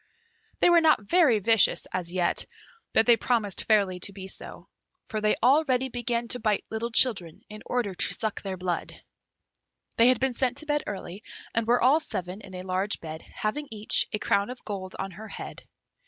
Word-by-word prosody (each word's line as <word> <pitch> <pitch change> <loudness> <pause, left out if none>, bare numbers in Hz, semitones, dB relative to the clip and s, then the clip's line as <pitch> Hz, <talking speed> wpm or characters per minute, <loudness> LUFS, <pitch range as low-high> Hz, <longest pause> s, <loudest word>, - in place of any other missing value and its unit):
They 350 - +5
were 340 -1 +6
not 310 -9 +4
very 315 - +4
vicious 225 +1 +4
as 175 -2 -2
yet; 180 -1 +1 0.4
but 220 - +4
they 235 -1 +6
promised 220 -6 0
fairly 200 -4 +2
to 200 - -4
be 190 -1 -9
so, - - -9 0.4
for 215 -1 -3
they 210 0 +2
already 265 -1 +3
began 240 -1 -2
to 250 - +1
bite 215 -3 0
little 225 +1 -2
children, 215 -9 +2
in 215 0 -10
order 240 -6 -1
to 180 - -2
suck 220 -2 -3
their 190 -2 -5
blood. 180 -2 -4 1.0
They 230 - +6
had 255 -2 +4
been 265 -1 0
sent 255 +1 -1
to 310 - -7
bed 295 -1 0
early, 195 -1 -6 0.3
and 230 -1 -1
were 240 0 +3
all 275 +5 +5
seven 185 - -5
in 190 -2 -11
a 180 - -6
large 190 +2 -1
bed, 160 -1 -8
having 290 +8 -3
each 215 -1 +3
a 210 - -1
crown 200 0 0
of 250 0 -9
gold 190 -3 -6
on 195 0 -4
her 210 +5 -10
head. - - -9
215 Hz, 195 wpm, -26 LUFS, 190-245 Hz, 1.0 s, were